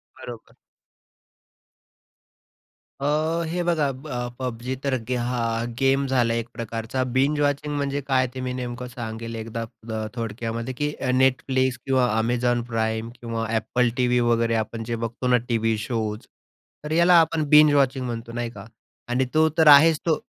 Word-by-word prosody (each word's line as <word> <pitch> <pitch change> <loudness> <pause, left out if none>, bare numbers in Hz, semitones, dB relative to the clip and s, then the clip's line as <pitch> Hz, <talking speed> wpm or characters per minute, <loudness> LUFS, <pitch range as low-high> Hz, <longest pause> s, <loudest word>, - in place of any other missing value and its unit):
बरोबर. 115 -2 -10 2.5
अ, - - -2 0.4
हे 175 +2 -2
बघा, 155 -5 +1
ब 125 -3 -6
पब्जी 125 0 -4
तर 140 -1 0 0.3
हा 125 0 -2 0.4
गेम 135 +1 +2
झाला 120 -3 +2
एक 115 0 -2
प्रकारचा. 115 +3 -3
बिंज 145 +3 +2
वॉचिंग 145 +1 0
म्हणजे 140 0 -1
काय 130 -1 +2
ते 130 - -6
मी 125 0 -3
नेमकं 125 0 -5
सांगेल 115 -1 -6
एकदा 115 +1 -5
अ, 110 -1 -6
थोडक्यामध्ये, 115 +2 -4
की 145 +3 -1 0.3
Netflix 130 0 +2
किंवा 130 -2 +2
Amazon 120 +1 0
Prime 110 0 -1
किंवा 115 -1 -3
AppleTV 125 +2 +1
वगैरे 115 0 +2
आपण 115 +1 -7
जे 115 +1 -3
बघतो 120 +2 -4
ना 125 0 +5
टीव्ही 115 -1 +1
शोज, 110 -1 -3 0.6
तर 150 - -6
याला 170 +2 +4
आपण 160 -1 +1
बिंज 150 -1 +7
वॉचिंग 135 -2 +2
म्हणतो, 115 -1 -5
नाही 120 0 -3
का. 100 -2 -11 0.4
आणि 130 +2 +1
तो 160 0 +4
तर 160 -1 +5
आहेच 150 +2 +8
तो 160 -2 +2
125 Hz, 150 wpm, -24 LUFS, 115-135 Hz, 2.5 s, आहेच